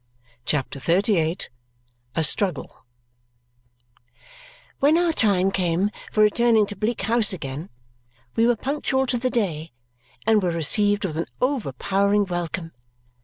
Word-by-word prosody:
CHAPTER 140 -1 -2
XXXVIII 170 - +1 0.8
A 165 - +1
Struggle 150 - -1 1.9
When 295 +4 +4
our 345 -1 +2
time 195 -7 +2
came 185 +2 0 0.2
for 215 - +3
returning 225 0 +4
to 205 - -7
Bleak 215 +1 -2
House 225 0 +3
again, 145 -1 -6 0.7
we 230 +1 +3
were 240 - +3
punctual 265 +1 -1
to 245 -2 -1
the 255 +1 0
day 170 - -2 0.5
and 220 -1 +4
were 180 - 0
received 205 +5 +1
with 160 -4 -4
an 165 - -2
overpowering 200 - +1
welcome. 175 -2 -4
200 Hz, 120 wpm, -23 LUFS, 170-230 Hz, 1.9 s, When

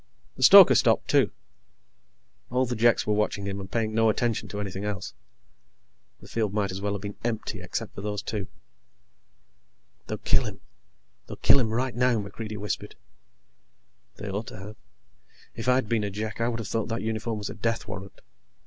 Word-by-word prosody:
The - - -10
stoker - - +10
stopped, - - +3
too. - - +4 1.2
All 125 +1 +1
the 125 0 -3
Jeks 115 +1 +3
were 105 - +1
watching 105 -1 0
him 100 0 -3
and 95 -1 -8
paying 110 -2 -1
no 115 0 +4
attention 115 +1 0
to 105 - -5
anything 100 -1 -4
else. 100 -2 -4 1.1
The - - -13
field 105 -3 -1
might 100 -3 0
as 95 +1 -5
well 100 0 -1
have 100 0 -5
been 100 0 -6
empty 115 -2 -3
except - - -4
for - - -7
those 105 0 -3
two. 105 -4 -4 1.6
"They'll - - -3
kill - - +2
him. - - -6 0.7
They'll - - -7
kill 140 - +6
him 115 -4 +1
right 125 +2 -1
now," 125 -1 +3
MacReidie 105 +1 -5
whispered. 105 0 -4 1.2
They 105 - -7
ought 100 +3 -3
to - - -8
have. 100 +3 -9 0.8
If 115 +2 -6
I'd 125 -2 +3
been 110 -1 +1
a 100 - -1
Jek, 110 +3 -5
I 115 - +2
would 120 -1 -1
have 110 - -5
thought 110 +2 -1
that 115 0 -3
uniform 110 0 -2
was 105 -1 -4
a - - -6
death 115 +1 -2
warrant. 100 -2 -8
110 Hz, 185 wpm, -27 LUFS, 100-115 Hz, 1.6 s, stoker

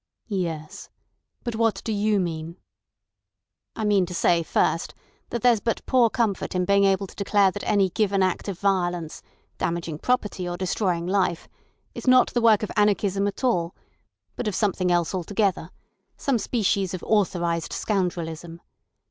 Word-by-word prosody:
"Yes. 165 -6 -4 0.5
But 240 - -3
what 225 -1 0
do 225 - -2
you 210 0 +1
mean?" 165 -1 -4 1.2
"I 220 - -2
mean 200 -3 +3
to 180 - -6
say, 170 0 +3
first, 165 0 0 0.3
that 235 -2 -4
there's 240 -3 +5
but 230 +2 -2
poor 250 -3 +4
comfort 220 -6 -1
in 180 0 +1
being 200 +1 +4
able 195 0 +2
to - - -13
declare 200 -1 +3
that 205 - -7
any 195 -3 +2
given 195 -1 +1
act 185 +2 -1
of 195 -3 -4
violence—damaging 175 -3 -3
property 210 -7 -1
or 175 - -4
destroying 180 -2 -1
life—is 185 +5 -4
not 255 0 +5
the 240 - +1
work 220 -2 +5
of 215 - -3
anarchism 205 -2 +2
at 205 - -5
all, 180 -9 +1 0.6
but 245 - -3
of 210 - -1
something 185 -4 +1
else 175 0 +1
altogether—some 195 - -2
species 200 -4 0
of 180 - -8
authorised 175 -5 0
scoundrelism. 170 -4 -3
195 Hz, 150 wpm, -24 LUFS, 175-210 Hz, 1.2 s, there's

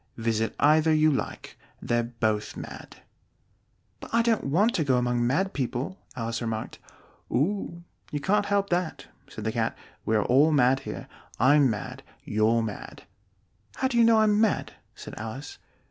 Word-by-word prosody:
Visit 115 -1 -1
either 155 +2 +4
you 155 0 +4
like: 135 - -4 0.2
they're 120 0 0
both 110 -3 -2
mad." - - -10 1.0
"But - - -10
I 230 0 +3
don't 230 -2 +1
want 195 - +2
to 160 - +1
go 130 -3 +2
among 120 -1 +1
mad 190 +10 0
people," 130 +7 -3 0.2
Alice 115 -1 -3
remarked. 115 -1 -4 0.5
"Oh, 170 +4 -1 0.3
you 145 - -2
can't 205 +6 +1
help 200 -1 0
that," 175 -2 -1 0.2
said - - -8
the - - -1
Cat: - - -1 0.3
"we 110 - 0
are 105 - +2
all 140 +6 +4
mad 135 -2 +4
here. - - -6 0.3
I'm 140 +3 +5
mad. 105 -2 -5 0.2
You're 110 +2 +2
mad." 105 -3 -7 0.7
"How 260 - 0
do 260 - -4
you - - +7
know 230 -1 +5
I'm 210 0 +3
mad?" 220 -3 +1 0.2
said - - -10
Alice. 115 +6 -7
135 Hz, 160 wpm, -26 LUFS, 115-185 Hz, 1.0 s, you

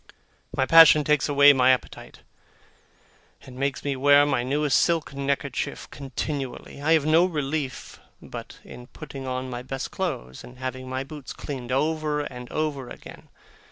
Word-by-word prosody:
My 130 - +2
passion 160 -1 +8
takes 150 0 +1
away 145 0 +7
my 130 -1 +3
appetite, 130 -1 -2 1.2
and 130 - -12
makes 140 +2 -2
me 140 -1 -1
wear 145 +2 +5
my 145 -4 0
newest 140 +1 +1
silk 165 -4 0
neckerchief 140 -1 -3
continually. 140 0 -5
I 155 +3 +3
have 155 -3 +3
no 160 +2 +5
relief 150 -5 -4 0.2
but - - -9
in 125 0 -12
putting 135 +1 -9
on 130 0 -3
my 120 0 -5
best 135 +2 -5
clothes, 135 - -4
and 125 +1 -13
having 130 0 -6
my 130 +1 -3
boots 145 -1 -9
cleaned 130 -4 -7
over 150 +2 0
and 125 -3 -8
over 145 -5 -3
again. - - -12
140 Hz, 155 wpm, -25 LUFS, 130-150 Hz, 1.2 s, passion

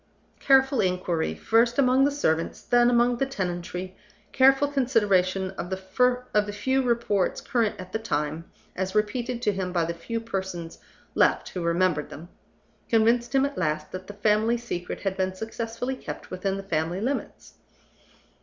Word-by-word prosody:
Careful 270 -1 +4
inquiry, 180 -3 -1
first 230 +1 +2
among 265 0 +4
the 285 - +2
servants, 165 - -1
then 240 0 +4
among 240 0 +3
the 270 - +1
tenantry, 185 -4 -4 0.4
careful 270 +2 +5
consideration 200 -9 +1
of 175 - -4
the 210 +2 0
few 260 +5 +1
reports 235 -6 0
current 230 -6 -1
at 185 0 -9
the 220 - -2
time, 155 -6 -2 0.3
as 190 +2 -3
repeated 240 +3 -1
to 210 - +3
him 185 -1 -3
by 170 -2 +1
the 170 - -3
few 230 +8 -4
persons 190 -6 -5 0.3
left - - +2
who 180 - -5
remembered 170 -2 +1
them, 165 +4 -10 0.6
convinced 235 +3 +2
him 270 0 +4
at 280 -5 -4
last 155 -3 -1
that 185 0 -7
the 205 - -8
family 215 +3 +2
secret 180 -7 -5
had 195 -1 -1
been 185 0 -1
successfully 230 +4 -4
kept - - -8
within 195 +1 -2
the 195 - -6
family 165 0 -1
limits. 260 +7 -4
205 Hz, 155 wpm, -26 LUFS, 185-245 Hz, 0.6 s, careful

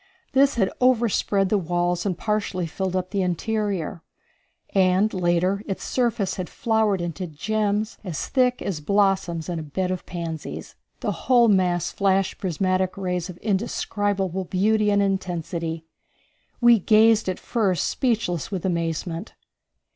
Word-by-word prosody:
This 275 +1 +4
had 195 -5 +1
overspread 230 -5 +2
the 210 - +2
walls 175 +1 0
and 180 -4 -1
partially 205 -4 -1
filled 185 +3 -3
up 185 0 -2
the 200 -1 0
interior, 185 -2 -2 0.7
and 190 +2 +3
later 180 +2 +1
its 195 - -4
surface 235 -5 0
had 185 -2 -4
flowered 220 -5 +1
into 175 +2 -4
gems, 210 +6 -1
as 175 -7 -4
thick 250 -2 +1
as 175 -7 -3
blossoms 190 -2 +1
in 175 -2 -3
a - - -4
bed 180 +5 -2
of 185 - -5
pansies. 165 -3 -6 0.3
The - - 0
whole 240 -3 +3
mass 180 -3 +2
flashed 195 -1 +1
prismatic 185 0 0
rays 180 -2 -2
of 180 - -8
indescribable 195 -2 -1
beauty 210 +4 +2
and 200 0 +3
intensity. 170 -4 -2 0.7
We 240 -2 +6
gazed 220 +1 +4
at 185 - -2
first 200 -7 0
speechless 215 - -1
with 190 -3 -4
amazement. 170 +1 -2
190 Hz, 140 wpm, -24 LUFS, 175-210 Hz, 0.7 s, We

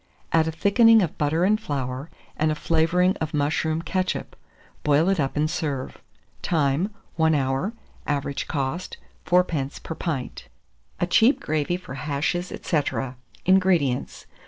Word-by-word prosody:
Add 165 -1 +3
a - - 0
thickening 220 +6 +5
of 165 - -4
butter 150 +3 +1
and 215 +3 +3
flour, 135 -3 -4 0.3
and 155 0 +1
a - - -1
flavouring 170 +5 +2
of 155 -1 -3
mushroom 155 +2 0
ketchup; 185 +1 -2 0.5
boil 150 +4 +3
it 195 -3 +1
up 135 0 -1
and 150 +1 +2
serve. 145 -4 -3 0.4
Time. 155 +3 +1 0.3
1 160 -1 +3
hour. 135 +9 0 0.3
Average 140 -1 -2
cost, 145 +5 -3 0.3
4d. 160 -5 +1
per - - -5
pint. 155 -6 -4 0.5
A - - +2
CHEAP 225 +9 +4
GRAVY 155 +3 -1
FOR 175 -7 -10
HASHES, 150 +6 -1
&c. - - -7 0.2
440. 135 -2 -3 0.3
INGREDIENTS. 180 -9 +2
160 Hz, 140 wpm, -24 LUFS, 140-180 Hz, 0.5 s, thickening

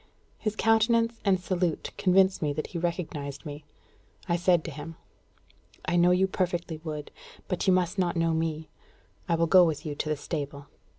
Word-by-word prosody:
His 215 -1 -2
countenance 230 +1 +3
and 195 -3 +3
salute 180 -3 -1
convinced 190 0 +3
me 150 -2 0
that 155 +1 -3
he 170 - -5
recognised 155 -5 -4
me. 145 0 -8 0.6
I 170 - +2
said 175 -1 +3
to 165 - -6
him: 155 +3 -8 0.9
"I 175 - 0
know 175 0 +5
you 180 +1 +4
perfectly, 175 -4 -2
Wood; 150 -2 -5 0.4
but 180 +1 -2
you 190 - +6
must 180 +1 +1
not 175 -2 +1
know 165 0 +2
me. 160 -1 -2 0.6
I 170 - +3
will 165 0 +2
go 180 +2 +7
with 160 -2 -1
you 150 - -3
to 150 - -3
the 155 - 0
stable." 140 -2 -5
170 Hz, 180 wpm, -28 LUFS, 155-185 Hz, 0.9 s, go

